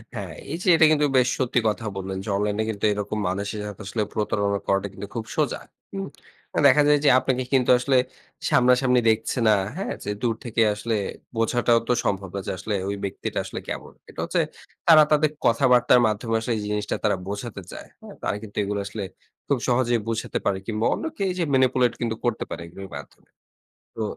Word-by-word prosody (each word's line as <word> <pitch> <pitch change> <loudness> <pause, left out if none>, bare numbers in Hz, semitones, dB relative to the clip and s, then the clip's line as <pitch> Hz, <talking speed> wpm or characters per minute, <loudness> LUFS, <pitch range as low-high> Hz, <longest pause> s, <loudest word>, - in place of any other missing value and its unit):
হ্যাঁ, 95 -6 -5 0.2
এই 165 - -2
যে - - -5
এটা 160 - +6
কিন্তু 150 -1 +3
বেশ 125 -1 +4
সত্যি 125 -1 +2
কথা 110 +1 -1
বললেন 95 0 -4
যে, 110 - -6
অনলাইনে 105 +1 0
কিন্তু 105 -2 -2
এরকম 105 +1 -3
মানুষের 100 +3 -3
সাথে 105 +1 -8 0.3
প্রতারণা 100 -1 0
করাটা 100 +1 +1
কিন্তু 95 +1 -7
খুব 115 -2 -3
সোজা। - - 0 0.3
হুম? 195 0 -4 0.6
দেখা 140 +2 +6
যায় 150 0 +5
যে, - - +7
আপনাকে 130 0 -1
কিন্তু 130 -2 +3
আসলে 130 +1 +2 0.5
সামনাসামনি 125 0 +4
দেখছে 110 +3 0
না, 110 - +6 0.2
হ্যাঁ? 195 - -3
যে 105 - -3
দূর 115 -2 +1
থেকে 115 -1 0
আসলে 110 +2 -2 0.4
বোঝাটাও 120 +1 +3
তো - - +3
সম্ভব 95 -1 -1
না - - -1
যে, - - -1
আসলে 105 +3 -3
ওই 100 - -2
ব্যক্তিটা 100 - -3
আসলে - - -5
কেমন? - - -5 0.2
এটা - - -12
হচ্ছে - - +1 0.5
তারা 155 -2 +9
তাদের 150 0 +4
কথাবার্তার 125 +1 +5
মাধ্যমে 115 +2 -1
আসলে 115 +2 -2
এই - - -3
জিনিসটা 105 0 -2
তারা 105 -2 +2
বোঝাতে 100 +1 -5
চায়। - - -9
হ্যাঁ? - - -11
তারা - - 0
কিন্তু 105 -2 -11
এগুলো 100 +1 -2
আসলে 100 +1 -5 0.4
খুব 140 - +2
সহজেই 120 -1 +2
বোঝাতে 115 0 -2
পারে 95 - +1
কিংবা 110 0 -1
অন্য - - -4
কেউ 200 - -1
এইযে 180 -1 -1
ম্যানিপুলেট 130 -2 +3
কিন্তু 115 -2 -1
করতে 120 -2 0
পারে, - - -5
এগুলোর 95 +3 -10
মাধ্যমে। 70 - -13 0.7
তো - - -5
115 Hz, 190 wpm, -24 LUFS, 105-125 Hz, 0.7 s, তারা